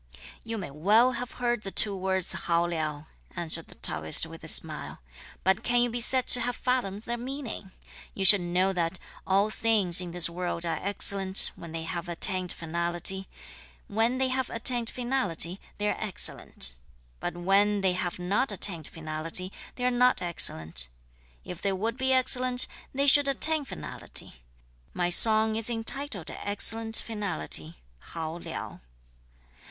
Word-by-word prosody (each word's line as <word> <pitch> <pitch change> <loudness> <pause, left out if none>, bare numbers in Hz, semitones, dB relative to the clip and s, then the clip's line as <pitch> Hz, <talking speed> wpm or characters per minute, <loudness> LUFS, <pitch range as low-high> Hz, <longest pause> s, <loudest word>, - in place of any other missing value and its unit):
"You 225 0 -6
may 185 -8 -7
well 210 - +2
have 245 0 -7
heard 240 -2 -2
the 195 - -6
two 200 +1 +3
words 190 -1 0
'hao 170 0 -1
liao,'" 155 -3 -5 0.3
answered 165 -2 -3
the - - -16
Taoist 80 -1 +1
with - - -13
a - - -9
smile, - - 0 0.4
"but 190 +1 +1
can 240 0 +1
you 245 - -2
be 240 +1 -3
said 255 +2 +2
to 250 - +7
have 245 +1 -3
fathomed 230 -6 -3
their 240 0 -5
meaning? 255 -5 -7 0.5
You 195 - -1
should 200 0 +8
know 180 +2 -1
that 175 0 -3 0.3
all 200 +3 +1
things 205 -7 +2
in 180 - -7
this 175 0 +3
world 175 0 -5
are 165 - -3
excellent, 195 -1 +5
when 170 - -11
they 165 0 -6
have 170 +2 -6
attained 185 +1 +1
finality; 170 +3 -3 0.6
when 225 +4 -1
they 260 0 0
have 260 -1 -3
attained 235 0 -3
finality, 240 -8 -3 0.2
they 210 - -2
are - - -2
excellent; 175 - -1 0.5
but 175 - -6
when 200 +3 +1
they 190 -1 +1
have 180 -1 -4
not 200 +8 -1
attained 175 -5 -1
finality, 160 +3 -4 0.2
they 250 - -5
are 250 - +1
not 250 +1 +2
excellent; 80 - +3 0.6
if 180 -1 -9
they 200 -1 -1
would 220 +5 -3
be 260 +1 0
excellent, 255 -1 +2 0.3
they 275 +1 -1
should 285 0 +6
attain 300 +2 +2
finality. 60 - -7 0.5
My 175 0 -1
song 220 +3 +8
is 225 +1 +2
entitled 230 - 0
Excellent 225 +2 +2
finality 160 - -1 0.2
(hao 160 - -8
liao)." - - -9
195 Hz, 160 wpm, -26 LUFS, 175-240 Hz, 0.6 s, should